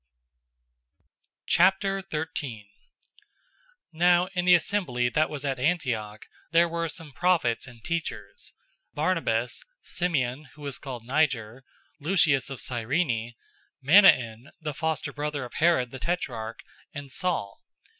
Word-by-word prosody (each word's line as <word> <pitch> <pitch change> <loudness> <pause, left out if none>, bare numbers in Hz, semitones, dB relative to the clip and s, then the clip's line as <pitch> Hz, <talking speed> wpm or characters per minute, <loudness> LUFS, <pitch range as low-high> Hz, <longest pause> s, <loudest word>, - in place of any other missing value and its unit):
013:001 170 - +1 1.3
Now 175 +2 +4
in 180 -2 0
the 180 0 +8
assembly 155 -10 0
that 155 +5 +1
was 145 -2 -5
at 135 -2 -1
Antioch 125 -9 -1 0.2
there 170 +1 +4
were 170 0 -2
some 160 -2 -6
prophets 165 -8 +1
and 120 -3 -14
teachers: 170 - -4 0.4
Barnabas, - - 0 0.2
Simeon 150 -5 -1
who 150 - -13
was 140 -2 -3
called 125 -5 -7
Niger, 130 -3 0 0.4
Lucius 150 -4 +3
of 135 -3 -6
Cyrene, 120 -1 -1 0.4
Manaen 130 - +5
the 155 -2 -4
foster 155 -1 -2
brother 145 -2 -3
of 120 - -11
Herod 155 -7 +2
the 130 - -8
tetrarch, 130 -9 -3 0.3
and 140 -2 -7
Saul. 160 - -2
145 Hz, 115 wpm, -27 LUFS, 125-170 Hz, 1.3 s, the